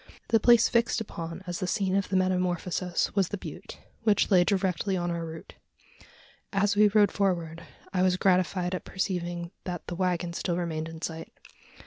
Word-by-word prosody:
The 225 - +4
place 235 +1 +6
fixed 235 0 +1
upon 170 -4 -6
as 175 -1 -4
the 185 - -2
scene 190 0 0
of 195 -1 0
the 195 - -1
metamorphosis 180 -1 0
was 195 -3 +2
the 205 - -4
butte - - -9 0.2
which 210 -1 +2
lay 180 -2 +6
directly 190 +1 0
on 175 0 -1
our 170 0 -3
route. 160 0 -8 1.0
As 205 0 +2
we 210 +1 +6
rode 205 0 +4
forward, 170 -4 -1 0.3
I 180 - +1
was 185 0 +3
gratified 185 -1 +1
at 185 - -3
perceiving 175 -3 -3
that 175 -2 -5
the - - -5
waggon 175 -1 -1
still 170 0 -2
remained 160 -2 -3
in 165 0 -10
sight. 165 -1 -5
180 Hz, 175 wpm, -28 LUFS, 175-195 Hz, 1.0 s, place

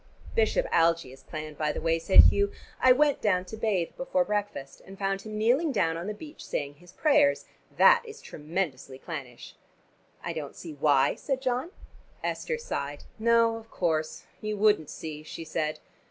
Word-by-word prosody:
"Bishop 460 +2 +2
Algie 165 -5 +2
is 135 - -15
clan, 155 -1 -7
by 150 0 -1
the - - -5
way," 165 0 +1
said 175 +4 +8
Hugh. 200 0 +3 0.3
"I 255 - +7
went 290 +2 +3
down 185 -4 +1
to 205 - -8
bathe 210 -6 -1
before 270 0 0
breakfast, 205 - -4
and 195 +1 -12
found 195 0 -1
him 215 +1 -7
kneeling 255 +9 +2
down 165 -9 +1
on 170 +3 -5
the 210 - -4
beach 300 +8 -11
saying 145 0 -4
his 175 0 -16
prayers. 290 +4 +3 0.3
That 485 0 +7
is 445 -1 -10
tremendously 150 -5 -4
clannish." 135 -6 -8 0.7
"I 170 - -3
don't 155 -3 -6
see 165 -3 -8
why," 145 -1 +3
said 270 -2 -3
John. 255 +4 -1 0.5
Esther 475 - -2
sighed. 145 - -5 0.2
"No, 230 0 +3
of 225 0 -13
course 160 -3 -1 0.2
you 215 0 -3
wouldn't 205 -7 +3
see," 155 -2 -7
she 165 +1 -8
said. 155 -1 -2
195 Hz, 175 wpm, -28 LUFS, 155-235 Hz, 0.7 s, said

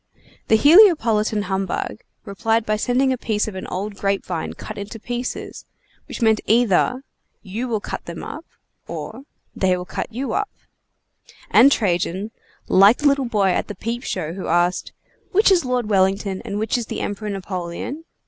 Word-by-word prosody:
The 220 - +5
Heliopolitan 235 - +5
humbug 195 +1 -3 0.3
replied 225 +3 0
by 215 - +1
sending 255 +4 +1
a 255 - -5
piece 215 -3 -1
of 215 - -5
an 185 - -6
old 200 +2 -4
grape 195 0 -1
vine 170 -3 -4
cut 215 - -8
into 210 +3 -7
pieces, 245 +2 -5 0.4
which - - -5
meant 220 -1 +3
either: 240 +3 +3 0.4
"You 220 +5 -4
will 225 -3 -1
cut - - -6
them 170 -1 -7
up," 315 - -7 0.4
or 270 - -7 0.3
"They 185 -1 +2
will 180 - -6
cut - - -5
you 255 +4 -3
up;" 415 0 -1 1.0
and 275 - +7
Trajan, 190 -1 0 0.4
like 200 +5 +6
the 295 - +2
little 280 -1 +2
boy 210 -5 +1
at - - -1
the 210 - -6
peep 230 +5 -4
show 170 - -3
who 190 0 -6
asked: 175 +2 +1 0.4
"which 410 +1 +5
is 355 -7 +3
Lord 250 -3 0
Wellington 195 -1 +1
and 200 - -4
which 220 +3 0
is 230 - -5
the - - -4
Emperor 210 +1 -4
Napoleon?" 190 - -5
215 Hz, 170 wpm, -21 LUFS, 190-245 Hz, 1.0 s, and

